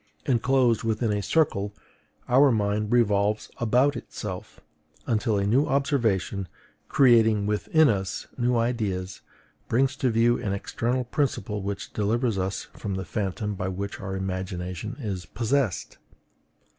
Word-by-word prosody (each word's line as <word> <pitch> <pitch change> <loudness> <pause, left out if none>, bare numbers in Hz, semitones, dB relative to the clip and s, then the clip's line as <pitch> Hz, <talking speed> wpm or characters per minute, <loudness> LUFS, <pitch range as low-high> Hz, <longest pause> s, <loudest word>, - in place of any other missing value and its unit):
Enclosed 125 -2 +2
within 110 0 0
a 105 - -1
circle, 105 -7 +1 0.5
our 135 +3 +5
mind 105 -1 0
revolves 105 -3 +2
about 125 +5 +2
itself, - - -7 0.5
until 110 -2 +1
a 100 - 0
new 125 +8 +3
observation, 115 - 0 0.4
creating 110 -5 +5
within 125 +9 +3
us 95 -5 -1
new 120 -1 +1
ideas, 105 -6 -2 0.5
brings 135 +4 +2
to 130 -3 +1
view 115 +1 +3
an 100 -5 -1
external 120 +5 -1
principle 125 -5 -2
which 100 0 -5
delivers 110 0 0
us 95 +1 -2
from 100 -3 -4
the 95 0 -4
phantom 105 +3 -2
by 95 -1 -3
which 100 +2 -4
our 95 -1 -4
imagination 95 +2 -4
is 100 -7 -4
possessed. 115 - -1
110 Hz, 130 wpm, -26 LUFS, 100-125 Hz, 0.5 s, our